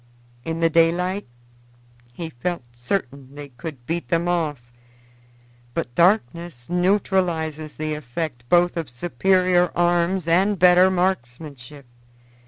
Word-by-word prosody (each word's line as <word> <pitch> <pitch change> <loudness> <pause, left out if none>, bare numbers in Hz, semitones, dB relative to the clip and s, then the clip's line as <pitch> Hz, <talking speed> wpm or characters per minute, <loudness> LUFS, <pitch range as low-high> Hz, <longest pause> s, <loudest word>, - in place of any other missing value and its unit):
In 165 +2 -4
the 165 - +4
daylight 175 +4 +2 0.8
he 160 +6 -7
felt 170 +3 -4
certain 130 +1 -4
they 145 -1 -8
could 135 -1 -9
beat 165 +4 -3
them 170 0 +1
off, 150 -9 -2 1.0
but 120 - -3
darkness 170 - +1
neutralizes 175 -5 0
the 155 0 -3
effect 150 -2 -5
both 175 0 +3
of 160 -6 -3
superior 180 +6 +2
arms 175 +1 +1
and 190 +5 +3
better 180 +1 +6
marksmanship. 145 -6 -3
165 Hz, 110 wpm, -22 LUFS, 145-180 Hz, 1.0 s, better